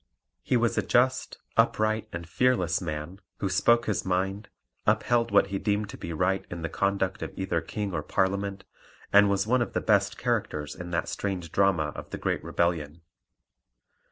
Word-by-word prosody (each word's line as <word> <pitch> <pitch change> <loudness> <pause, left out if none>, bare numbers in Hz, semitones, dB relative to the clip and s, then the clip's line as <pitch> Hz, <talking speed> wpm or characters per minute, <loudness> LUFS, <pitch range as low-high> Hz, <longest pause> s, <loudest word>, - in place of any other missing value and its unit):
He 125 - +1
was 120 -1 +1
a - - +3
just, 130 +2 +1 0.2
upright, 110 0 +2
and 85 -3 -6
fearless 90 -5 +2
man, 85 +3 -5 0.2
who 100 - -2
spoke 120 +5 +3
his 105 - -1
mind, 95 +3 -1 0.4
upheld 120 -1 +2
what 100 -1 +4
he 95 - 0
deemed 105 0 0
to - - -7
be 85 - -6
right 90 +4 0
in 85 -1 -6
the 80 - -2
conduct 100 0 0
of - - -4
either 95 -3 -1
King 100 +5 -4
or 75 - -1
Parliament, 95 +5 -1 0.5
and 100 0 +7
was 100 0 +1
one 125 +3 +2
of 120 - -2
the - - +1
best 100 -1 +2
characters 110 -11 -1
in 90 0 -8
that 85 - -1
strange 90 -5 -3
drama 90 -6 +2
of - - -8
the - - -5
Great - - -1
Rebellion. 85 -2 -1
95 Hz, 180 wpm, -27 LUFS, 85-105 Hz, 0.5 s, and